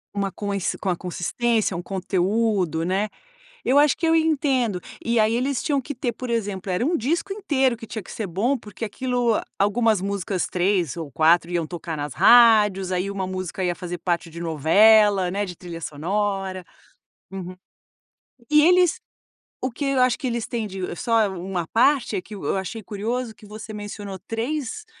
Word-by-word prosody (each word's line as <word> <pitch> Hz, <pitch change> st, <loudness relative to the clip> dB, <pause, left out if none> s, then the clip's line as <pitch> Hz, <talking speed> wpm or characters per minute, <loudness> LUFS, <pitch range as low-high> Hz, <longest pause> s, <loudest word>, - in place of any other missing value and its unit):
Uma 200 Hz, -1 st, -1 dB
coins 200 Hz, -2 st, -2 dB
com 195 Hz, -, -2 dB
a 180 Hz, -, +1 dB
consistência, 200 Hz, +4 st, -1 dB
um 175 Hz, -, -3 dB
conteúdo, 190 Hz, -2 st, 0 dB
né? 195 Hz, +3 st, 0 dB, 0.5 s
Eu 265 Hz, -, +3 dB
acho 290 Hz, -1 st, +5 dB
que 330 Hz, -, -1 dB
eu 325 Hz, -, +4 dB
entendo 270 Hz, -, +1 dB, 0.2 s
e 235 Hz, -1 st, +1 dB
aí 220 Hz, +2 st, +3 dB
eles 260 Hz, +1 st, 0 dB
tinham 290 Hz, -5 st, +1 dB
que 290 Hz, +4 st, -6 dB
ter, 245 Hz, -1 st, -2 dB
por 250 Hz, +1 st, -7 dB
exemplo, 200 Hz, -4 st, -2 dB
era 180 Hz, +6 st, 0 dB
um 335 Hz, +2 st, +1 dB
disco 330 Hz, -, -1 dB
inteiro 270 Hz, -, +1 dB
que 225 Hz, -, -9 dB
tinha 220 Hz, 0 st, -6 dB
que -, -, -12 dB
ser 220 Hz, -, -4 dB
bom, 220 Hz, +10 st, 0 dB
porque 210 Hz, 0 st, -10 dB
aquilo 245 Hz, 0 st, 0 dB, 0.2 s
algumas 210 Hz, 0 st, +2 dB
músicas, 195 Hz, -2 st, -2 dB
3 180 Hz, -3 st, 0 dB
ou 160 Hz, -4 st, -6 dB
4 165 Hz, +4 st, +3 dB
iam 170 Hz, -2 st, 0 dB
tocar 170 Hz, -2 st, -5 dB
nas 145 Hz, -2 st, -4 dB
rádios, 210 Hz, -2 st, +6 dB
aí 185 Hz, +2 st, -1 dB
1 195 Hz, -1 st, -3 dB
música 185 Hz, 0 st, -4 dB
ia 175 Hz, -1 st, 0 dB
fazer 175 Hz, -1 st, -6 dB
parte 170 Hz, -1 st, -1 dB
de 170 Hz, -, -9 dB
novela, 190 Hz, +5 st, +4 dB
né, 200 Hz, +1 st, -1 dB
de 180 Hz, -, -8 dB
trilha 170 Hz, -1 st, -9 dB
sonora. 190 Hz, +4 st, -2 dB, 0.7 s
Uhum. 185 Hz, -1 st, -6 dB, 0.9 s
E 300 Hz, 0 st, +6 dB
eles 360 Hz, 0 st, +4 dB, 0.6 s
o 255 Hz, -, -1 dB
que 285 Hz, -, -6 dB
eu 275 Hz, -1 st, +1 dB
acho 250 Hz, -1 st, +3 dB
que 285 Hz, -, -6 dB
eles 235 Hz, -2 st, -2 dB
têm 230 Hz, -3 st, -2 dB
de 185 Hz, -3 st, -5 dB
só 225 Hz, -1 st, +2 dB
uma 180 Hz, -2 st, -3 dB
parte, 245 Hz, -, +2 dB
é 185 Hz, -, -1 dB
que 210 Hz, -, -12 dB
eu 200 Hz, -, -8 dB
eu -, -, 0 dB
achei 215 Hz, +4 st, -5 dB
curioso 220 Hz, +4 st, -3 dB
que 210 Hz, -, -16 dB
você 215 Hz, +1 st, -9 dB
mencionou 205 Hz, -1 st, -6 dB
3 280 Hz, -, -3 dB
205 Hz, 185 wpm, -23 LUFS, 185-240 Hz, 0.9 s, rádios